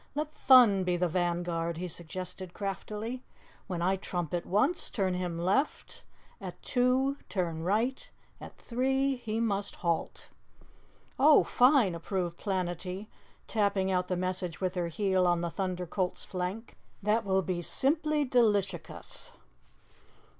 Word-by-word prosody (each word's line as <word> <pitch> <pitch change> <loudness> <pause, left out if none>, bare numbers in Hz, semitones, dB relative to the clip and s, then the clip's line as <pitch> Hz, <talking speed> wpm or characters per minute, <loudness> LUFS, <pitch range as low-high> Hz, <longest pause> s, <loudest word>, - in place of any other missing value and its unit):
"Let 300 +1 -1
Thun 245 -10 +6
be 180 -1 +1
the 180 +1 +1
vanguard," 170 -1 -1
he 180 +2 -3
suggested 180 +2 -7
craftily. 210 +4 -4 0.5
"When 175 -4 -3
I 190 +2 +2
trumpet 175 -2 -3
once, 260 - +1
turn 190 -4 0
him 180 -2 -2
left; 195 - -1 0.4
at - - -7
two, 260 +2 +2
turn 170 -4 -2
right; 220 +9 0 0.3
at - - -11
three, 265 +2 0
he 225 -2 -3
must 205 -3 -1
halt." 170 -2 -2 0.9
"Oh, 295 +2 +7
fine," 250 - +4
approved 175 0 -3
Planetty, 185 +1 -3 0.4
tapping 200 -3 +1
out 180 -1 +1
the 180 - -1
message 185 -2 -2
with 185 -1 -1
her 175 -2 -1
heel 190 +1 +1
on 175 -1 +2
the 170 -1 -2
Thunder 185 -1 -2
Colt's 180 +1 -2
flank. 185 +5 -5 0.3
"That 215 +3 +2
will 190 -1 +1
be 175 +1 -2
simply 300 - +1
delishicus." 205 - 0
190 Hz, 130 wpm, -30 LUFS, 180-230 Hz, 0.9 s, Oh